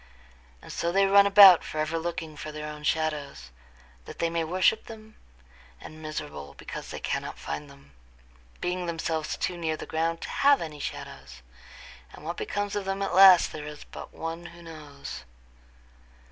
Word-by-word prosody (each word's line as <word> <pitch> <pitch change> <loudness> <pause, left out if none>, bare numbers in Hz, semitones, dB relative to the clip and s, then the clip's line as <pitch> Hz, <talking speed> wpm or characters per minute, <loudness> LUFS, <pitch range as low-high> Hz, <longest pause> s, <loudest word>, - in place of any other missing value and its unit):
And - - -10
so 170 - -1
they 195 +2 +4
run 200 +1 +6
about 195 -3 +9
forever 155 +1 -2
looking 165 -2 -5
for 155 +1 -7
their 150 0 -6
own 150 0 -8
shadows, 150 - -2 0.5
that - - -10
they 165 0 0
may 165 0 0
worship 185 +6 +2
them, 220 -1 -12 0.6
and 155 - -11
miserable 75 - -6
because - - -8
they - - -6
cannot - - -3
find 75 0 -6
them, 70 0 -18 0.7
being 180 0 -2
themselves 165 -1 -2
too 180 - -2
near 160 -2 -1
the - - -7
ground 165 +1 -1
to - - -6
have 280 0 +4
any 150 -3 -6
shadows; - - -8 0.7
and - - -12
what 170 +2 -4
becomes 205 0 -3
of 205 -1 -2
them 195 +1 -2
at 195 - -2
last 190 -1 +8
there 150 -1 -7
is 150 -1 -9
but - - -10
one 165 +1 -6
who 170 0 -13
knows. 150 -4 -9
165 Hz, 170 wpm, -27 LUFS, 155-185 Hz, 0.7 s, about